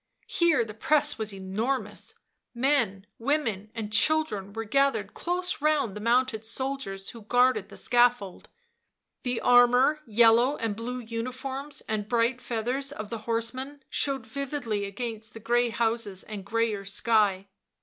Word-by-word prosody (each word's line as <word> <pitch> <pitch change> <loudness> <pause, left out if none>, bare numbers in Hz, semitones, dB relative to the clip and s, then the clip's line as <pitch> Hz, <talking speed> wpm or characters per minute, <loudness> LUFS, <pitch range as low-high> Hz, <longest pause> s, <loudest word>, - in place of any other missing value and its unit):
Here 335 -8 +2
the 215 - -8
press 295 +5 +2
was 215 -1 -2
enormous; 200 +7 -3 0.4
men, 235 -7 +1
women 230 -6 -1
and 215 -2 -5
children 225 -8 +3
were 225 +2 -4
gathered 275 +5 +1
close 355 -1 -2
round 295 -8 +1
the - - -5
mounted 235 -1 +1
soldiers 225 -5 -4
who 230 - -12
guarded 245 +4 +2
the - - -12
scaffold; 240 -6 +1 0.7
the 245 -2 -2
armour, 245 +4 +5
yellow 235 +5 +4
and 225 -3 -2
blue 240 +3 -5
uniforms 255 +5 -5
and 210 -1 -3
bright 240 +1 +1
feathers 250 +4 -2
of 215 -6 -7
the 230 - -3
horsemen 260 +5 -2
showed 270 -4 0
vividly 245 -4 -3
against 220 +1 -6
the - - -7
grey 240 +2 +1
houses 225 -4 0
and 205 -3 -8
greyer 225 -2 0
sky. 200 -1 +1
235 Hz, 140 wpm, -27 LUFS, 215-265 Hz, 0.7 s, armour